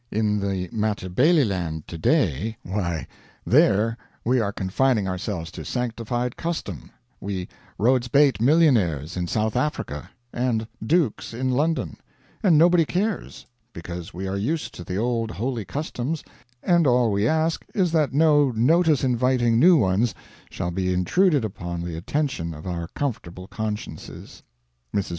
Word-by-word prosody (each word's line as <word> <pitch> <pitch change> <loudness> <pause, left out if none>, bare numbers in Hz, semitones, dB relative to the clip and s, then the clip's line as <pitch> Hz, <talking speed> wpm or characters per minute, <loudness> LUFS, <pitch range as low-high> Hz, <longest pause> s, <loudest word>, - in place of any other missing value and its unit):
In 105 -1 0
the 95 -2 -2
Matabeleland 105 - +1
today 85 - 0
why, 90 -4 -2 0.4
there 110 +3 +4 0.3
we 125 +2 +3
are 100 -3 0
confining 100 +3 +1
ourselves 90 -3 -4
to - - -8
sanctified 120 0 -2
custom, 160 - -4 0.3
we 95 -2 -4 0.3
Rhodes 125 +2 +2
Beit 140 -1 +3
millionaires 115 - +3
in 90 -1 -2
South 110 +4 -1
Africa 95 - -2 0.2
and 120 -3 -1 0.2
Dukes 135 -4 0
in 130 +2 -1
London; 155 +6 0 0.4
and 185 -8 +5
nobody 170 +1 +5
cares, 200 +7 -3 0.3
because 85 0 -7
we 95 +3 -5
are 95 +1 -2
used 150 +11 -2
to 90 - -8
the 90 +1 -4
old 115 0 0
holy 115 0 -3
customs, 145 - -4 0.4
and 170 -4 +3
all 120 -3 +3
we 100 +2 +1
ask 160 +2 +1
is 185 -4 +2
that 155 -3 +2
no 145 -1 +4
notice 150 +6 +3
inviting 125 -2 +2
new 175 +5 +7
ones 105 0 +1 0.3
shall 90 - -3
be 90 +1 -1
intruded 140 - +2
upon 85 -4 -5
the 85 -1 -5
attention 95 - -2
of 75 - -11
our 85 -2 -3
comfortable 95 -10 -4
consciences. 105 0 -6 0.5
Mrs. 100 -1 0
115 Hz, 140 wpm, -24 LUFS, 95-140 Hz, 0.5 s, new